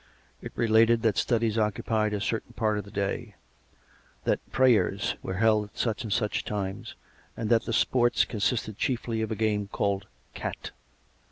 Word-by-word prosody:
It - - -7
related 115 0 +4
that 110 -4 +3
studies 115 -2 +1
occupied 105 0 0
a 105 - -1
certain 110 +2 -3
part 110 -1 0
of 100 - -6
the - - -11
day; 100 -1 -3 0.9
that - - +1
"prayers" 125 -8 +3
were 95 - -4
held 110 +1 +3
at 105 +3 -19
such 115 +2 -1
and 110 - -5
such 105 -1 0
times, 95 -2 -4 0.4
and 110 -1 -2
that 115 -1 +4
the - - -3
s|3orts 120 +1 +3
consisted 110 -1 -1
chiefly 115 -3 -1
of 110 - -2
a - - 0
game 105 -2 0
called 100 -1 -1 0.2
" - - -37
Cat." - - -5
110 Hz, 170 wpm, -27 LUFS, 105-115 Hz, 0.9 s, related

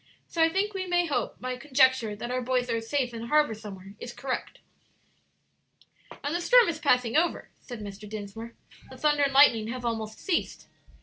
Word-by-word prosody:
So 335 - -2
I 325 - +6
think 400 +5 -1
we 375 -1 -4
may 350 0 +2
hope 300 - -2
my 255 0 -4
conjecture 260 -4 +2
that 240 +4 -6
our 255 0 -1
boys 250 0 0
are 230 0 0
safe 245 +1 -1
in 230 0 -6
harbor 300 -3 +3
somewhere, 200 -3 -10
is 240 - -7
correct." 265 -2 -4 1.7
"And 290 - -2
the 345 - -1
storm - - +6
is 320 -2 -2
passing 250 -6 +2
over," 335 +3 +1
said 240 -4 -9
Mr. 205 0 -9
Dinsmore; 215 +2 -7 0.3
"the - - -11
thunder 295 -1 +2
and 280 -1 +3
lightning 255 -6 +5
have 245 +1 -5
almost 220 -2 -3
ceased." 360 - -2
250 Hz, 185 wpm, -27 LUFS, 225-300 Hz, 1.7 s, I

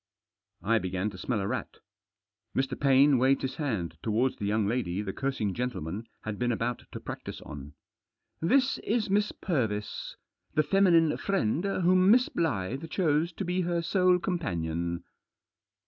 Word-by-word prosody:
I 115 +2 +3
began 95 +2 -2
to 95 - -10
smell 110 -1 -1
a 95 - -2
rat. - - -4 0.8
Mr. 135 0 0
Paine 135 0 +5
waved 135 +2 +3
his 130 - -3
hand 95 - -2
towards 115 +4 +1
the 105 - -3
young 105 0 +1
lady 100 -4 -1
the 95 -2 -4
cursing 135 -8 -1
gentleman 115 -4 -4
had 110 -1 -5
been 120 0 +1
about 120 +1 -2
to - - -6
practise - - -7
on. 70 0 -9 0.7
"This 255 +10 +3
is 215 -3 -1
Miss 210 +1 +2
Purvis, 110 - -2 0.4
the 155 - +4
feminine 165 -2 +4
friend 170 - 0
whom 185 -1 +3
Miss 245 +3 +5
Blyth 135 - -2
chose 160 -1 +1
to 195 - -4
be 180 +1 0
her 170 -1 -1
sole 180 +1 +3
companion. 85 - -2
130 Hz, 150 wpm, -29 LUFS, 105-175 Hz, 0.8 s, Paine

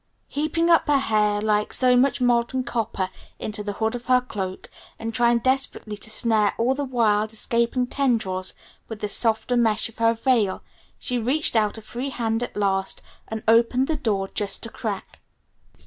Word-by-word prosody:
Heaping 320 +3 0
up 335 -1 +4
her 290 -1 +4
hair 210 -5 +1
like 210 -1 +1
so 250 -1 +3
much 265 +3 +3
molten 245 +1 +1
copper 225 -6 -2 0.3
into 215 0 -4
the 205 0 -3
hood 220 +2 -1
of 245 0 -6
her 255 0 +5
cloak, 195 -7 -6 0.3
and 225 0 -5
trying 240 0 +3
desperately 260 -3 0
to 215 - -7
snare 220 -2 +2
all 240 +3 +2
the 285 +2 -3
wild, 220 -4 +1
escaping 235 +3 0
tendrils 225 -9 -1 0.3
with 225 -2 -8
the 210 - -1
softer 225 +3 0
mesh 225 -2 +2
of 225 - -18
her 230 0 +3
veil, 225 -5 +1 0.3
she 250 -2 -2
reached 260 +5 0
out 215 -1 +2
a 220 - -10
free 245 +5 -5
hand 230 -3 -1
at 245 - -5
last 195 -1 0 0.2
and 220 0 -5
opened 235 +3 +4
the 315 - 0
door 210 -9 -1
just 205 +2 -2
a - - -6
crack. 210 -4 -5
230 Hz, 180 wpm, -24 LUFS, 210-250 Hz, 0.3 s, her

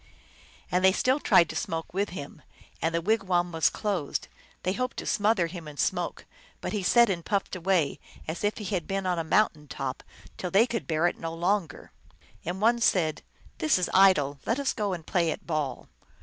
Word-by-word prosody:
And 180 +1 +2
they 190 0 +6
still 260 +7 +2
tried 170 - +5
to - - -6
smoke 165 -8 -3
with 200 +2 0
him, 150 -3 -8 0.4
and 165 +1 0
the 170 - 0
wigwam 185 -4 +1
was 160 -2 +3
closed; 195 -9 -2 0.3
they 185 - 0
hoped 255 +3 -3
to - - -4
smother 205 -3 +2
him 165 -1 -7
in 150 -1 -10
smoke, - - -1 0.3
but - - -4
he 210 - -1
sat 235 +6 +5
and 175 -4 -2
puffed 200 0 -1
away 180 -5 +1 0.3
as 160 +5 -4
if 205 +1 0
he 210 - -6
had 185 -5 -2
been 195 0 -2
on 180 -2 0
a - - -1
mountain 160 -3 +1
top, 135 -1 -4 0.4
till 180 - -3
they 200 +6 +5
could 235 -2 -4
bear 160 +1 +1
it 175 - 0
no 165 0 -4
longer. 180 +1 -1 0.5
And 175 +3 -4
one 235 +3 +3
said, 165 -8 +2 0.2
" - - -27
This 155 +3 +3
is 180 - -1
idle; 150 -8 +5
let 230 - +1
us 280 - 0
go 205 -4 -1
and 165 -3 -6
play 170 -3 +1
at - - -4
ball." 150 -6 -3
180 Hz, 205 wpm, -27 LUFS, 165-205 Hz, 0.5 s, they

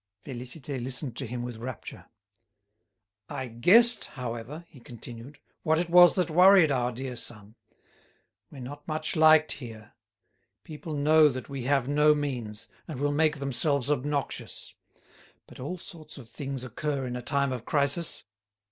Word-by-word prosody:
Félicité 130 +1 -6
listened 125 -1 -2
to 135 0 -5
him 120 +1 -5
with 120 -2 -6
rapture. 120 +1 -8 1.2
"I 130 - -4
guessed, 220 - +4
however," 125 +5 -7
he 145 - -16
continued, 120 +3 -10 0.2
"what 160 0 +2
it 170 0 -2
was 175 0 +8
that 180 -3 0
worried 180 -1 +6
our 125 -2 0
dear 130 +1 -5
son. 110 -3 -9 1.0
We're 135 - -11
not 145 +4 -9
much 155 +1 -1
liked 155 -1 +6
here. 110 -5 -8 0.7
People 155 0 -7
know 150 +1 +5
that 130 0 -6
we 135 -3 -5
have 135 -2 +1
no 150 +1 +4
means, 125 -8 -4 0.2
and 155 -6 -6
will 145 +1 +1
make 155 +1 +2
themselves 140 0 0
obnoxious. 145 0 -3 0.7
But - - -15
all 145 +8 -5
sorts 155 -3 -11
of 130 -5 -11
things 135 +1 -6
occur 135 +2 -3
in 125 -1 -4
a 125 - -4
time 140 +2 0
of 125 -3 -4
crisis. 145 +3 +1
140 Hz, 150 wpm, -28 LUFS, 125-155 Hz, 1.2 s, was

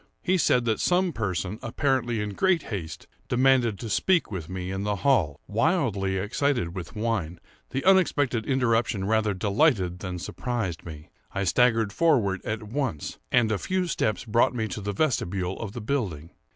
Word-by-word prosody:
He 185 - +2
said 125 -5 +3
that 110 -2 +1
some 180 -1 +2
person, 100 -2 -3
apparently 120 -2 0
in 105 -1 -3
great 185 - +2
haste, 85 -5 -5 0.2
demanded 125 -4 +3
to 115 - -6
speak 175 - +2
with 90 -5 -5
me 95 0 -4
in 95 0 -3
the 105 0 0
hall. 90 - +3
Wildly 105 - +1
excited 105 -2 -1
with 85 -2 -7
wine, 105 -7 -2 0.3
the 135 - -3
unexpected 145 - +3
interruption 115 -6 +1
rather 110 -1 +1
delighted 100 - +1
than 90 -1 -5
surprised 100 -2 -4
me. 75 -2 -10 0.2
I 100 - -1
staggered 115 +1 +3
forward 105 - +2
at 110 0 -3
once, 110 - -3
and 120 -3 +3
a 105 - 0
few 185 0 -1
steps 110 - -1
brought 115 +2 +2
me 110 -2 -1
to 105 - -5
the 100 +1 -2
vestibule 95 - -1
of 105 -3 -5
the 120 - -6
building. 100 - -3
110 Hz, 165 wpm, -26 LUFS, 95-130 Hz, 0.3 s, said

